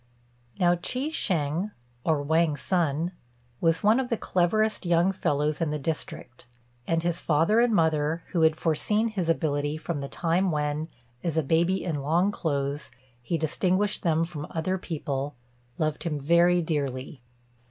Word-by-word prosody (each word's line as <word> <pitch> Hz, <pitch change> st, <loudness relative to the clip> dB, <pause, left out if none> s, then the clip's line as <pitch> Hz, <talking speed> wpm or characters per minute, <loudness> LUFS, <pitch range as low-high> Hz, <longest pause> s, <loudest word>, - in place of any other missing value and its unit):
Now 175 Hz, -1 st, +4 dB
Chi 255 Hz, -, -3 dB
shêng, 175 Hz, -, 0 dB, 0.3 s
or 155 Hz, -3 st, +1 dB
Wang 160 Hz, 0 st, +2 dB
Sun, 165 Hz, 0 st, 0 dB, 0.5 s
was 165 Hz, -1 st, +2 dB
one 215 Hz, +4 st, +5 dB
of 255 Hz, -2 st, -2 dB
the 230 Hz, -, 0 dB
cleverest 215 Hz, +5 st, +1 dB
young 175 Hz, +1 st, +3 dB
fellows 150 Hz, -4 st, 0 dB
in 165 Hz, -, +1 dB
the 150 Hz, -, -1 dB
district; 135 Hz, -5 st, -5 dB, 0.4 s
and 165 Hz, 0 st, +1 dB
his 175 Hz, -1 st, -1 dB
father 165 Hz, +8 st, +3 dB
and 240 Hz, 0 st, +4 dB
mother, 160 Hz, -3 st, +1 dB
who 170 Hz, -, 0 dB
had 160 Hz, -1 st, +5 dB
foreseen 210 Hz, +8 st, +1 dB
his 185 Hz, -6 st, -2 dB
ability 150 Hz, -2 st, 0 dB
from 160 Hz, -2 st, -4 dB
the 140 Hz, -, -5 dB
time 175 Hz, +3 st, +1 dB
when, 150 Hz, 0 st, -1 dB, 0.4 s
as 165 Hz, -2 st, -1 dB
a 160 Hz, -, +3 dB
baby 170 Hz, +6 st, +2 dB
in 160 Hz, -6 st, -2 dB
long 170 Hz, +8 st, +2 dB
clothes, 140 Hz, -5 st, -2 dB, 0.3 s
he 165 Hz, +8 st, -1 dB
distinguished 185 Hz, +6 st, 0 dB
them 165 Hz, -2 st, +2 dB
from 160 Hz, -3 st, -5 dB
other 185 Hz, +4 st, -2 dB
people, 145 Hz, -5 st, -3 dB, 0.4 s
loved 155 Hz, -1 st, -1 dB
him 150 Hz, -4 st, -2 dB
very 170 Hz, +4 st, +4 dB
dearly. 140 Hz, -3 st, -3 dB
165 Hz, 155 wpm, -27 LUFS, 150-180 Hz, 0.5 s, one